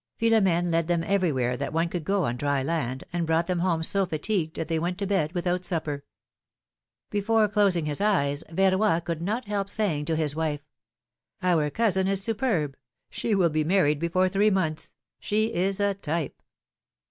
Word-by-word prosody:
Philomene 195 -7 +2
led 165 -1 +1
them 170 -1 +1
every 185 -2 +1
where 125 -2 0
that 125 - -4
one 165 +1 +1
could 170 -1 -4
go 195 +1 +1
on 120 - -1
dry 140 +1 0
land, 135 -4 -2
and 170 -2 -1
brought 165 +1 +2
them 180 -1 -1
home 170 -2 0
so 195 +4 +2
fatigued 160 0 -2
that 160 - -3
they 165 0 0
w'ent 175 +2 -2
to 200 - -2
bed 190 -6 0
without 180 0 -1
supper. 155 -5 -3 1.1
Before 215 +1 +2
closing 200 -5 +2
his 150 +2 -2
eyes, 155 -8 +1
Yerroy 190 0 +2
could 165 -2 -3
not 215 +8 -2
help 200 -1 -2
saying 190 -9 -1
to 160 - 0
his 155 -2 +1
wife: 155 -2 -2 0.8
^^Our 165 -5 +2
cousin 190 -3 +1
is 195 0 +2
superb! 200 - 0 0.4
She 220 - -1
will 175 -4 +3
be 155 0 +1
married 150 -4 +2
before 170 +3 +1
three 200 +3 +3
months! 160 -6 -2 0.2
She 215 +2 0
is 190 +3 0
a 200 0 +2
type 165 -5 -4
175 Hz, 180 wpm, -26 LUFS, 155-195 Hz, 1.1 s, will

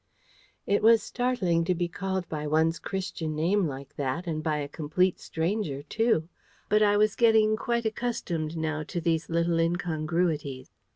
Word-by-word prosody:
It 200 - +2
was 225 +1 +6
startling 230 -10 0
to 180 - +1
be 175 0 -1
called 190 +1 -3
by 150 -1 -4
one's 160 +2 +2
Christian 180 -5 -4
name 175 +4 +2
like 140 0 -8
that, 145 +5 -2
and 155 -3 -2
by 155 -1 0
a 145 -1 -3
complete 160 +5 0
stranger, 160 -4 -2
too; 220 -2 +1 0.4
but 210 +1 +4
I 205 -1 +4
was 210 -1 +3
getting 220 -2 +4
quite 235 +1 -1
accustomed 195 -9 -2
now 155 -1 -1
to 175 +4 -4
these 165 -1 0
little 170 0 +1
incongruities. 165 -4 -1
170 Hz, 160 wpm, -27 LUFS, 155-205 Hz, 0.4 s, was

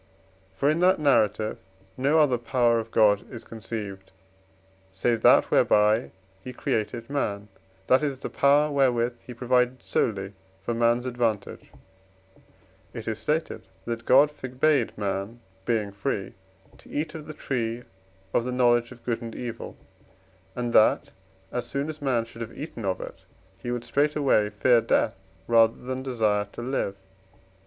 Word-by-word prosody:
For 140 - 0
in 155 +3 +2
that 185 +2 +4
narrative 110 -7 +2 0.4
no 140 +5 +2
other 140 -6 +3
power 120 0 +2
of 115 0 -6
God 105 -3 +3
is 120 -2 -8
conceived, 105 -4 -7 0.8
save 115 +4 0
that - - +5
whereby 105 +3 +3 0.3
he 130 - -7
created 115 0 -2
man, 105 -8 -2 0.4
that 130 +7 +4
is 140 -3 -1
the - - -5
power 145 +2 +3
wherewith 125 -4 +1
he 125 - -11
provided 125 +1 +1
solely 100 -3 -1 0.3
for 120 - -2
man's 120 +1 +2
advantage; 120 -4 -2 1.3
it 115 -2 -7
is 110 -1 -2
stated 155 +8 -2 0.2
that 115 0 -4
God 145 +3 +6
forbade 130 -1 0
man, 100 +3 -3 0.3
being 110 -4 0
free, 100 0 -3 0.5
to - - -17
eat 155 +1 -3
of 155 -2 -8
the 155 - -7
tree 120 -4 -3 0.5
of - - +2
the 125 - -3
knowledge 120 -1 +2
of 125 -2 -14
good 120 -1 -1
and 115 -1 -7
evil, 120 -2 -6 0.8
and 120 -1 -3
that, 110 - +4 0.4
as 125 -1 -3
soon 140 +2 -2
as 155 -1 -7
man 125 -5 +1
should 115 0 -12
have 115 0 -7
eaten 140 -7 -6
of 95 -1 -1
it, - - -8 0.4
he 120 - -6
would 120 -1 -2
straightway 140 -4 +2
fear 115 +3 +3
death 115 - 0 0.3
rather 115 -1 +4
than 130 +1 -5
desire 110 -6 0
to 120 - -7
live. 125 -6 -2
120 Hz, 150 wpm, -26 LUFS, 110-130 Hz, 1.3 s, God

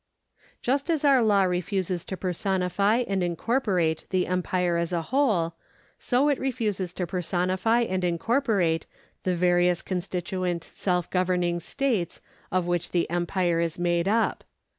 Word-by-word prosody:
Just 275 +5 0
as 315 -3 +1
our 275 -3 +6
law 205 -3 +4
refuses 180 0 -1
to 190 - -5
personify 190 +5 +1
and 195 -1 0
incorporate 175 - 0
the 185 -1 +1
empire 180 -1 0
as 170 0 -1
a 170 -2 -1
whole, 210 - +1 0.5
so 260 +3 +2
it 285 -2 +2
refuses 215 -9 -2
to 180 - -2
personify 185 +5 0
and 185 -5 -1
incorporate 180 - +1 0.3
the 185 -1 0
various 175 0 +2
constituent 180 -1 -2
self 180 -3 -1
governing 180 -1 +1
states 225 - -1 0.3
of 185 -1 +1
which 175 -1 -1
the 175 -1 0
empire 175 0 0
is 170 -1 -1
made 175 0 +1
up. 225 +3 +1
180 Hz, 140 wpm, -26 LUFS, 175-210 Hz, 0.5 s, our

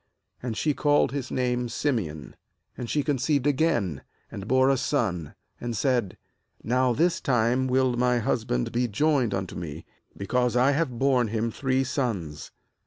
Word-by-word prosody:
And 120 -3 -4
she 150 - +1
called 145 -2 +2
his 135 -2 -4
name 125 -1 0
cSimeon. 110 - -2 0.4
MAnd 120 - -6
she 150 - +1
conceived 140 0 0
again, 130 - +1 0.3
and 100 +1 -7
bore 130 +2 +4
a - - +3
son; 95 - -1 0.2
and 120 -2 -4
said: 120 -6 0 0.5
'Now 125 +2 +2
this 170 +8 +1
time 125 +1 +2
will 130 -1 +2
my 125 0 +2
husband 110 - -1
be 120 +1 +1
djoined 125 -2 +1
unto 95 -1 -4
me, 80 -2 -6 0.3
because 125 +4 0
I 130 +3 +4
have 140 -4 -1
borne 130 -2 +2
him 115 +1 -1
three 130 +2 0
sons.' 115 - -3
125 Hz, 155 wpm, -26 LUFS, 110-135 Hz, 0.5 s, bore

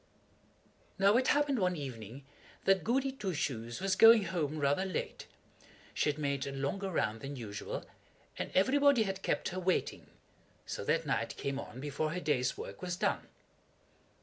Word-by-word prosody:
Now 200 +2 +5
it 255 +1 +3
happened 290 -3 +2
one 180 -2 +1
evening 130 - -7 0.4
that 195 -1 +4
Goody 270 +3 +1
Two 205 -9 -4
Shoes 120 -5 -3
was 195 0 +1
going 225 0 +8
home 160 -5 -2
rather 145 +4 +2
late. 190 -1 -4 0.7
She - - +1
had 145 - -2
made 140 -2 -1
a - - -3
longer 140 +9 -2
round 110 - -1
than 140 +1 -6
usual, 105 -5 -5 0.5
and - - -4
everybody 270 +4 +5
had 195 -1 -4
kept - - -1
her 185 - -4
waiting, 185 0 -1 0.6
so - - -5
that - - +1
night - - -1
came 140 0 -2
on 130 -3 -8
before 150 +3 -2
her 180 - -2
day's 130 -6 0
work - - -8
was 180 -1 -2
done. - - -1
170 Hz, 165 wpm, -32 LUFS, 140-195 Hz, 0.7 s, going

